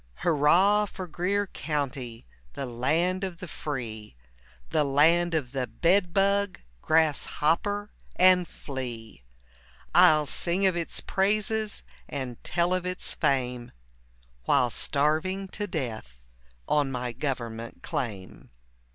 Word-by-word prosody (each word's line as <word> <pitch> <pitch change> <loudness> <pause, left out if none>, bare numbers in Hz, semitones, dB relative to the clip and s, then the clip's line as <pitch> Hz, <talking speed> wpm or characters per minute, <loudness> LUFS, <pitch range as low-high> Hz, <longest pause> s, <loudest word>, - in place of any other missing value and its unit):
Hurrah 175 +7 +4
for 190 -1 -7
Greer 185 +5 -1
County! 135 - -4 0.3
The 135 - -4
land 165 +10 0
of 185 -3 -4
the 185 0 -8
free, 115 - -6 0.6
The 150 - +3
land 165 +5 +3
of 135 -6 -1
the 130 -2 -2
bed 175 - +2
bug, 200 +1 +2 0.2
Grass 160 -2 +2
hopper 205 +7 0 0.2
and 180 -1 +5
flea; 120 - -7 0.7
I'll 155 -1 +6
sing 175 +6 0
of 190 -2 +3
its 170 -1 -2
praises 215 +2 0 0.3
And 130 -4 -5
tell 175 +1 +1
of 185 -1 0
its 180 0 -2
fame, 125 -3 -1 0.7
While 125 -1 +3
starving 155 +10 0
to 205 +2 -4
death 115 - -5 0.5
On 145 -2 +2
my 125 -1 -3
government 115 -3 -5
claim. 100 -8 -5
155 Hz, 115 wpm, -27 LUFS, 125-185 Hz, 0.7 s, I'll